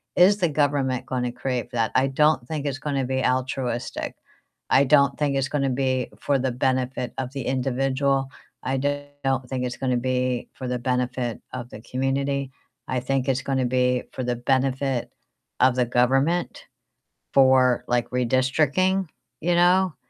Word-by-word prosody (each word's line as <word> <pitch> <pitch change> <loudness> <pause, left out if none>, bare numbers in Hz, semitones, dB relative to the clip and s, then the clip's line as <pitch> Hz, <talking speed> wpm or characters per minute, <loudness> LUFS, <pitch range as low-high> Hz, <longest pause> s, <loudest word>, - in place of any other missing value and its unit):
is 195 +3 +6
the 175 -5 +1
government 140 -3 0
gonna 125 -1 -1
create 125 -1 -3
for 120 - -5
that? 115 -1 +1
I 130 - +4
don't 145 -2 +2
think 150 -1 -4
it's 135 - -2
gonna 140 -3 -1
be 130 0 -1
altruistic. 130 -1 -2 0.5
I 135 - +5
don't 140 0 +4
think 145 -2 0
it's 135 0 0
gonna 140 -2 0
be 130 -1 0
for 140 -1 +1
the 130 0 0
benefit 130 0 -1
of 130 -1 -3
the 135 -3 -4
individual. 135 +1 0 0.3
I 135 +1 -1
do 145 +1 -1 0.2
not 130 -1 0
think 130 -1 -2
it's 125 - -3
gonna 130 -2 0
be 125 0 -1
for 130 - -6
the 125 -1 -2
benefit 125 -1 -2
of 125 -1 -6
the 105 - -10
community. 135 +2 -1 0.4
I 130 -1 -1
think 135 +1 -1
it's 130 0 +1
gonna 130 -2 0
be 125 0 +1
for 130 - -4
the 120 0 -1
benefit 130 +1 0 0.5
of 130 0 +4
the 125 -1 +2
government 135 +8 +1 0.7
for, 130 -2 +5
like, 120 -1 +1
redistricting, 140 +9 +1 0.3
you 175 +2 +1
know, 180 0 +4
130 Hz, 165 wpm, -24 LUFS, 125-140 Hz, 0.7 s, is